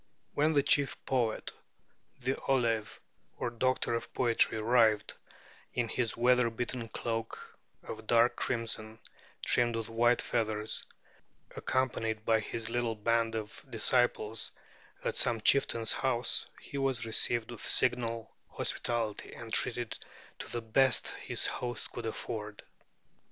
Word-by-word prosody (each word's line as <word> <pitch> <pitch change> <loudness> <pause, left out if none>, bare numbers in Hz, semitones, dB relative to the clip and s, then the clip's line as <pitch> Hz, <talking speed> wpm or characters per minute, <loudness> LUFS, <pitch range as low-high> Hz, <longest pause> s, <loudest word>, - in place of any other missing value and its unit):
When 155 +2 +2
the 140 -2 +4
chief 145 -1 +3
poet, 120 -4 0 0.7
the 130 +2 0
ollave, 115 -5 +1 0.4
or 120 - -2
doctor 130 +1 0
of 115 - -3
poetry, 115 -2 +3
arrived, 110 -2 +3 0.6
in 120 -2 0
his 115 -1 -1
weather 125 0 +4
beaten 120 +1 -3
cloak 115 0 -5 0.2
of 110 - -8
dark 120 +1 +4
crimson 110 -2 -2 0.5
trimmed 120 -1 +3
with 115 -1 -3
white 120 +1 +3
feathers, 110 -1 -1 0.7
accompanied 115 -4 -1
by 110 -1 +4
his 110 +1 -4
little 120 -2 0
band 115 +1 +1
of 105 -2 -6
disciples, 115 -1 +2 0.5
at - - -1
some 115 - +3
chieftain's 115 -1 +4
house, 125 -2 0
he 140 - -6
was 135 -3 0
received 115 +1 0
with 120 - -7
signal 115 -3 +1
hospitality 115 -3 -2
and 115 -1 -9
treated 120 -2 0 0.4
to - - -6
the 120 -1 -3
best 130 +3 +3
his - - -3
host 120 -1 -3
could 115 -1 -5
afford. 105 -1 -5
115 Hz, 125 wpm, -31 LUFS, 110-125 Hz, 0.7 s, the